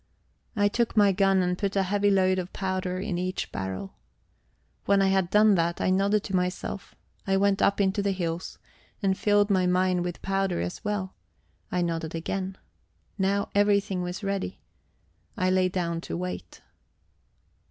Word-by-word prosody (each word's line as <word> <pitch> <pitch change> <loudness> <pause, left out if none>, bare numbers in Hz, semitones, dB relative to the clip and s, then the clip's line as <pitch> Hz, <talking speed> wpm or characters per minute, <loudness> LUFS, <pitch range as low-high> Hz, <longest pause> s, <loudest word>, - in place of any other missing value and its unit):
I 205 -1 +3
took 230 +2 -1
my 205 -1 +6
gun 195 -1 +3
and 180 0 0
put 200 +1 -2
a 195 - +3
heavy 205 +2 +1
load 185 -1 +3
of 180 0 -5
powder 185 -1 -2
in 190 -3 -2
each 185 +1 -3
barrel. 95 0 -5 0.9
When 200 0 +4
I 195 0 +3
had 190 -2 +2
done 210 +1 +5
that, 170 -2 +1
I - - +1
nodded 200 +2 +2
to 195 - -3
myself. 180 +2 -3 0.3
I 195 0 +3
went 200 0 +2
up 200 - +3
into 200 +1 +2
the 200 - 0
hills 175 -2 -3 0.5
and 190 -1 +2
filled 205 +1 +2
my 185 -2 +3
mine 180 0 +2
with 175 0 -5
powder 195 -1 0
as 90 +1 -4
well; 205 -3 -2 0.6
I 180 -1 +1
nodded 165 -1 -3
again. 190 +3 -3 0.6
Now 200 +1 +1
everything 200 -2 +2
was 180 +3 -5
ready. 195 - -3 0.8
I 185 0 +2
lay 185 0 +3
down 170 -2 -2
to 85 - -5
wait. 90 0 -6
190 Hz, 165 wpm, -27 LUFS, 180-200 Hz, 0.9 s, my